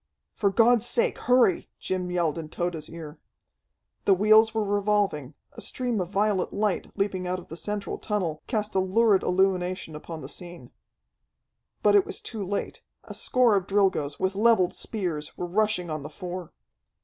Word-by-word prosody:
"For 200 Hz, -, +1 dB
God's 235 Hz, +2 st, +4 dB
sake 240 Hz, -, +1 dB
hurry!" 245 Hz, -7 st, +3 dB
Jim 185 Hz, -1 st, -3 dB
yelled 170 Hz, -3 st, 0 dB
in 155 Hz, -1 st, -7 dB
Tode's 170 Hz, -2 st, -3 dB
ear. 160 Hz, -2 st, -9 dB, 0.9 s
The 195 Hz, -, +5 dB
wheels 215 Hz, +3 st, +5 dB
were 220 Hz, -1 st, 0 dB
revolving, 200 Hz, -8 st, 0 dB, 0.2 s
a -, -, -11 dB
stream 245 Hz, -5 st, -2 dB
of 175 Hz, -, -4 dB
violet 200 Hz, -1 st, +1 dB
light, 205 Hz, -2 st, -1 dB
leaping 190 Hz, -2 st, -1 dB
out 180 Hz, +1 st, -1 dB
of 180 Hz, -, -11 dB
the 165 Hz, -, -7 dB
central 205 Hz, +3 st, -4 dB
tunnel, 180 Hz, -8 st, -2 dB
cast 215 Hz, -3 st, -1 dB
a 190 Hz, -, +2 dB
lurid 195 Hz, +1 st, +3 dB
illumination 185 Hz, -3 st, 0 dB
upon 160 Hz, +1 st, -7 dB
the -, -, -7 dB
scene. 175 Hz, -8 st, -8 dB, 1.1 s
But 205 Hz, -, +5 dB
it 200 Hz, -2 st, +5 dB
was -, -, -3 dB
too 220 Hz, -4 st, -5 dB
late. 200 Hz, +2 st, -4 dB, 0.2 s
A -, -, -9 dB
score 250 Hz, -4 st, +3 dB
of 195 Hz, -1 st, 0 dB
Drilgoes, 190 Hz, -8 st, +1 dB
with 190 Hz, 0 st, 0 dB
leveled 205 Hz, -3 st, +3 dB
spears, 175 Hz, -9 st, -4 dB
were 180 Hz, -, -3 dB
rushing 185 Hz, -2 st, 0 dB
on 155 Hz, -1 st, -3 dB
the 145 Hz, -, -7 dB
four. 180 Hz, -2 st, -7 dB
190 Hz, 170 wpm, -26 LUFS, 175-210 Hz, 1.1 s, The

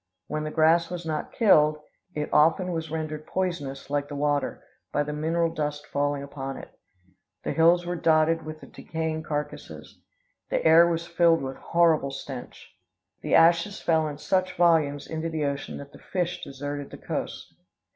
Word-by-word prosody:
Where 155 Hz, 0 st, -3 dB
the 155 Hz, -, -3 dB
grass 160 Hz, +2 st, +3 dB
was 175 Hz, -1 st, -6 dB
not 155 Hz, -2 st, -3 dB
killed, 155 Hz, -9 st, +4 dB, 0.4 s
it 150 Hz, -1 st, -3 dB
often 175 Hz, +4 st, +4 dB
was 160 Hz, -2 st, -3 dB
rendered 155 Hz, -1 st, -4 dB
poisonous, 165 Hz, -8 st, -3 dB
like 145 Hz, 0 st, 0 dB
the 145 Hz, -, -7 dB
water, 145 Hz, 0 st, -1 dB, 0.3 s
by 145 Hz, -, +1 dB
the 150 Hz, 0 st, -5 dB
mineral 165 Hz, +2 st, 0 dB
dust 150 Hz, -2 st, -3 dB
falling 145 Hz, 0 st, -1 dB
upon 135 Hz, -1 st, -6 dB
it. -, -, -10 dB, 0.7 s
The -, -, -2 dB
hills 170 Hz, +2 st, +4 dB
were 175 Hz, +1 st, -2 dB
dotted 165 Hz, 0 st, +3 dB
with 155 Hz, 0 st, -8 dB
the -, -, -10 dB
decaying 160 Hz, -1 st, -4 dB
carcasses. 150 Hz, -1 st, -6 dB, 0.5 s
The -, -, -1 dB
air 165 Hz, +2 st, +7 dB
was 170 Hz, 0 st, -1 dB
filled 170 Hz, -2 st, +3 dB
with 135 Hz, 0 st, -5 dB
horrible 165 Hz, -5 st, +2 dB
stench. 135 Hz, -2 st, -9 dB, 0.5 s
The -, -, +1 dB
ashes 170 Hz, +4 st, +4 dB
fell 160 Hz, -2 st, +2 dB
in 145 Hz, -1 st, -6 dB
such 185 Hz, +4 st, 0 dB
volumes 160 Hz, -5 st, +3 dB
into 160 Hz, +1 st, -4 dB
the 155 Hz, -2 st, -2 dB
ocean 140 Hz, 0 st, -3 dB
that 140 Hz, 0 st, -10 dB
the -, -, -14 dB
fish 175 Hz, -1 st, -3 dB
deserted 145 Hz, +1 st, -5 dB
the -, -, -10 dB
coast. -, -, -5 dB
155 Hz, 170 wpm, -26 LUFS, 145-170 Hz, 0.7 s, air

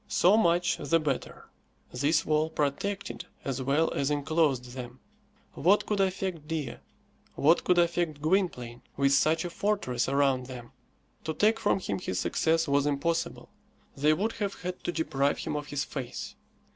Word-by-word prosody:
So 185 Hz, +1 st, +4 dB
much 175 Hz, -4 st, +3 dB
the 165 Hz, +2 st, +1 dB
better. 145 Hz, -4 st, -3 dB, 0.4 s
This 150 Hz, +6 st, +1 dB
wall 155 Hz, +1 st, +2 dB
protected 160 Hz, +7 st, -2 dB, 0.2 s
as 135 Hz, -1 st, -2 dB
well 140 Hz, +5 st, +1 dB
as 140 Hz, -, 0 dB
enclosed 145 Hz, -4 st, +1 dB
them. 125 Hz, 0 st, -8 dB, 0.5 s
What 190 Hz, +7 st, +3 dB
could 210 Hz, -1 st, -1 dB
affect 185 Hz, -5 st, -1 dB
Dea, 150 Hz, -6 st, -3 dB, 0.6 s
what 160 Hz, +5 st, +4 dB
could 180 Hz, -, +3 dB
affect 170 Hz, -3 st, +1 dB
Gwynplaine, 155 Hz, -8 st, 0 dB, 0.2 s
with 140 Hz, 0 st, +3 dB
such 160 Hz, +5 st, +3 dB
a 175 Hz, -, -4 dB
fortress 170 Hz, -, -1 dB
around 135 Hz, -2 st, +2 dB
them? 125 Hz, -2 st, -9 dB, 0.5 s
To 160 Hz, 0 st, -2 dB
take 220 Hz, +2 st, +3 dB
from 195 Hz, -, +2 dB
him 100 Hz, -, -3 dB
his 90 Hz, -, -3 dB
success 165 Hz, +10 st, +1 dB
was 140 Hz, 0 st, +2 dB
impossible. 165 Hz, +4 st, -1 dB, 0.5 s
They 150 Hz, +3 st, +3 dB
would 210 Hz, +8 st, 0 dB
have 200 Hz, -3 st, -3 dB
had 180 Hz, 0 st, -5 dB
to -, -, 0 dB
deprive 145 Hz, -4 st, 0 dB
him -, -, -4 dB
of 150 Hz, 0 st, -4 dB
his 145 Hz, -1 st, -2 dB
face. 130 Hz, -4 st, -6 dB
155 Hz, 160 wpm, -28 LUFS, 140-175 Hz, 0.6 s, So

